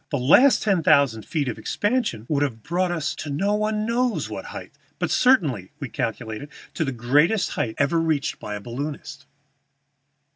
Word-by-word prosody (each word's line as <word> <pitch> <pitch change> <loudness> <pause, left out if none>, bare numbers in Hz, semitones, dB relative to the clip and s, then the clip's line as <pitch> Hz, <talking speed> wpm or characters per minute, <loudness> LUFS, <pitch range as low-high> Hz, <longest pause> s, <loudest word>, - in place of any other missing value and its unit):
The 145 - -1
last 170 - +5
ten 195 -5 +2
thousand 140 -8 +3
feet 150 -4 -1
of 120 - -4
expansion 205 - -1
would 145 0 0
have 115 -6 -2
brought 175 +3 0
us 165 -4 -2
to 155 - -6
no 190 +9 0
one 215 0 0
knows 240 +1 0
what - - -6
height, - - -8 0.3
but - - -2
certainly, 145 - +2
we 135 -4 -5
calculated, 110 +5 -4 0.2
to - - -1
the 135 - -2
greatest 145 - +2
height 110 -2 -2
ever 145 +4 +2
reached 160 -4 -1
by 105 - -5
a 105 - -6
balloonist." 140 +6 -6
150 Hz, 175 wpm, -23 LUFS, 125-195 Hz, 0.3 s, last